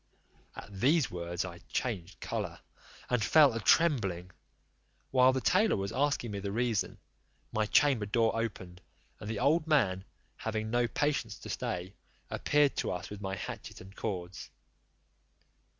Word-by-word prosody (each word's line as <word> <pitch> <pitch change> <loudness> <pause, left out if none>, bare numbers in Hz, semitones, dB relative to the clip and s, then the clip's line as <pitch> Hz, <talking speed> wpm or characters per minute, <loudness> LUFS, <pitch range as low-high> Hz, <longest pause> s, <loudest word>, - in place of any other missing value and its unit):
At 100 -1 -9
these 145 +1 +3
words 85 0 -3
I 85 -2 -8
changed 95 -8 -3
colour, - - -4 0.5
and 125 -3 +1
fell 145 +2 +6
a 115 - -2
trembling. 105 - +2 0.8
While 130 0 +6
the 130 0 -1
tailor 195 - +3
was 100 0 -3
asking 140 -4 0
me 100 - -4
the 100 0 -4
reason, 115 -1 0 0.5
my 110 -1 0
chamber 130 -5 +3
door 115 +1 +2
opened, 95 -5 -4 0.4
and 105 - -7
the 110 - -2
old 155 +7 +2
man, 100 -12 +2 0.3
having 110 -1 -3
no 120 0 +2
patience 140 -3 -1
to - - -10
stay, 90 +2 -3 0.4
appeared 145 -1 +2
to - - -1
us 90 +1 -4
with 105 -1 -7
my 95 -1 -3
hatchet - - -7
and 95 +2 -13
cords. 90 -4 -5
110 Hz, 150 wpm, -31 LUFS, 95-130 Hz, 0.8 s, fell